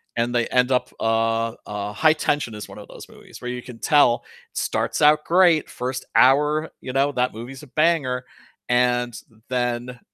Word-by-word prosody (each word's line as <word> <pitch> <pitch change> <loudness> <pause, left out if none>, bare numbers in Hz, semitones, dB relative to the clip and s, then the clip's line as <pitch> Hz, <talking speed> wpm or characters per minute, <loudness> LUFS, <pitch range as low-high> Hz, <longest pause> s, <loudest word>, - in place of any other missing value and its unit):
And 120 +1 -1
they 120 -1 +1
end 125 +1 +2
up 125 - 0
uh, 115 0 0
uh, 105 0 -5
High 155 +7 +4
Tension 145 -7 -1
is 105 - -8
one - - -11
of - - -12
those - - -12
movies, - - -14
where 125 0 -5
you 125 0 -5
can 125 -2 -11
tell, 145 -6 +3 0.3
starts - - -2
out 150 +1 +5
great, 175 -3 +4
first 130 +1 -4
hour, 150 +4 +4
you 130 - -6
know, 135 +2 +1
that 125 -3 -1
movie's 125 +4 -8
a 150 - -13
banger, 140 -5 +1 0.4
and 125 -1 +1 0.4
then 125 0 -2
125 Hz, 180 wpm, -22 LUFS, 120-145 Hz, 0.4 s, out